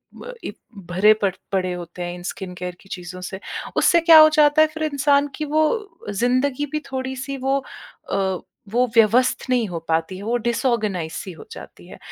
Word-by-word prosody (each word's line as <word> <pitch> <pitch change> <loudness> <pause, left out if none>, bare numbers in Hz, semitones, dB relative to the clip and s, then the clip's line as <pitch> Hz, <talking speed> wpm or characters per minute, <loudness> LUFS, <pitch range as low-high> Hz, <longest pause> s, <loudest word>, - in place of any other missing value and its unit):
ब - - -9
इ - - -4 0.4
भरे 200 +5 +5
पड़ 195 -2 +2 0.2
पड़े 185 -2 0
होते 175 0 -8
हैं 175 0 -4
इन 175 - -10
स्किन 185 -2 -8
केयर 180 0 -6
की 195 - -20
चीज़ों 180 0 -7
से। 190 +1 -6 0.4
उससे 340 - +5
क्या 330 -1 +8
हो 310 0 +9
जाता 295 +1 +5
है, 310 - +6
फिर 315 0 -6
इंसान 285 -1 +2
की 305 - -3
वो 310 +1 +2 0.4
ज़िंदगी 255 +6 0
भी 305 - -1
थोड़ी-सी 265 +1 -4
वो 270 +1 +2 0.5
अ, - - 0 0.5
वो 245 +4 +2
व्यवस्थ 230 +3 +4
नहीं 245 -3 +2
हो 175 -3 -5
पाती 165 +3 -1
है, 195 - -9
वो 230 +3 -1
डिसऑर्गनाइज़्ड 220 - -1
सी 190 - -6
हो - - -13
जाती - - -12
है। - - -12
235 Hz, 195 wpm, -22 LUFS, 185-280 Hz, 0.5 s, हो